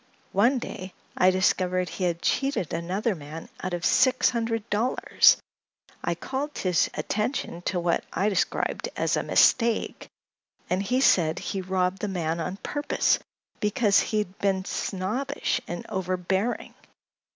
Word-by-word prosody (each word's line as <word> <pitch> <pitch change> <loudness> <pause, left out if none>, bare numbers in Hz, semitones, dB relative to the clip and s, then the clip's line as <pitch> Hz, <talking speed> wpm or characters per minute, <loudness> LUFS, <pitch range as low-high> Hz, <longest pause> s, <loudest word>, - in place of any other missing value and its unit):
One 235 +8 +3
day 185 -6 -6 0.2
I 185 - +5
discovered 185 -1 +1
he 185 - -3
had 170 -1 -1
cheated 270 - 0
another 185 +7 -1
man 155 -1 -9
out 185 -1 -2
of 170 - -4
six 255 0 +4
hundred 225 -2 -2
dollars. 230 +5 +4 0.7
I - - 0
called 285 +3 -4
his 180 -3 +2
attention 210 -5 -2
to 180 - -1
what 170 0 +1
I 195 +4 0
described 195 -4 0
as - - +1
a - - +1
'mistake,' 230 -2 +2 0.6
and 185 +1 +2
he 250 +7 +1
said 165 -9 +4
he 190 +1 -3
robbed 185 0 0
the 210 - -1
man 170 -4 -2
on 180 +4 -3
purpose, 290 +7 0 0.4
because 210 -1 +3
he 215 - -1
had 195 -3 -3
been 190 -1 0
snobbish 250 +11 -2
and 175 - -5
overbearing. 190 +4 -2
190 Hz, 140 wpm, -26 LUFS, 180-230 Hz, 0.7 s, I